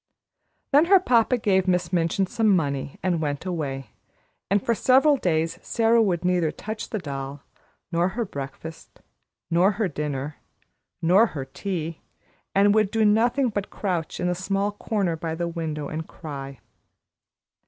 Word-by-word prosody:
Then 290 +3 +6
her 385 +2 +6
papa 245 -6 +3
gave 190 -4 +2
Miss 180 -1 +1
Minchin 170 +3 +1
some 215 +1 +2
money 140 -4 -2
and 175 -3 +1
went 145 +2 -3
away, 135 -9 -4 0.6
and 200 +2 +3
for 235 - +3
several 265 +6 +4
days 165 - 0
Sara 230 0 +3
would 180 -5 0
neither 180 -3 +2
touch 215 +7 -6
the 220 - -2
doll, 140 -4 -6 0.5
nor 170 +1 +2
her 230 +5 -2
breakfast, 145 0 -8 0.5
nor 180 +5 +4
her 205 0 0
dinner, 145 -2 -4 0.7
nor 190 +8 +5
her 140 -9 -6
tea, 165 +2 -4 0.5
and 200 +1 +5
would 215 -2 +3
do 220 0 +2
nothing 235 +5 +3
but 205 -2 -3
crouch 180 -6 -3
in 180 - 0
a 180 - +1
small 195 +3 -1
corner 200 -4 -1
by 160 0 -4
the 170 +1 -2
window 160 -3 -4
and 160 +2 -5
cry. 140 -4 -8
180 Hz, 155 wpm, -25 LUFS, 155-210 Hz, 0.7 s, Then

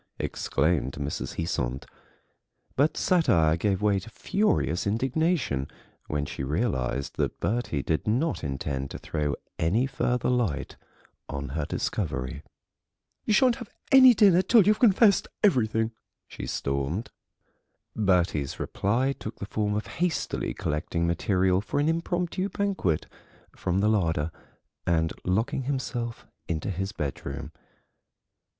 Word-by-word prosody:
exclaimed 70 -3 0
Mrs. 70 0 -4
Heasant. 70 -6 -2 0.9
But 145 +4 +2
satire 85 - +3
gave 95 +3 0
way 100 -2 +3
to 100 +5 -11
furious 185 - 0
indignation 130 - 0 0.4
when 75 -1 -1
she 70 - -5
realised 70 - -1
that - - -1
Bertie 105 - -1
did 80 +4 -1
not 130 - 0
intend 70 -1 -3
to - - -6
throw 75 -2 -2 0.2
any 100 +11 +2
further 125 -2 0
light 120 - 0 0.5
on 70 -1 -4
her 75 +2 -2
discovery. 65 - -3 0.8
"You 215 - +2
shan't 255 -1 +4
have 240 -5 -8 0.2
any 260 -3 +9
dinner 195 -4 +6
till 225 +2 +5
you've 210 +1 +3
confessed 210 -3 +5 0.2
everything," 115 - +3 0.4
she - - -7
stormed. 70 - -2 0.8
Bertie's 90 -9 +1
reply 125 +7 0
took 110 - -7
the - - -5
form 105 0 -1
of 105 - -2 0.2
hastily 180 -3 -1
collecting 85 +3 -1
material 90 +2 +2
for 115 - -2
an 145 - +2
impromptu 175 +3 -1
banquet 190 - 0 0.5
from 95 +1 0
the 105 - +3
larder 85 -7 +1 0.6
and 80 -2 +2
locking 115 +8 0
himself 125 -4 -3 0.2
into 85 +3 -2
his 95 +2 -3
bedroom. 70 -5 -5
100 Hz, 125 wpm, -27 LUFS, -, 0.9 s, any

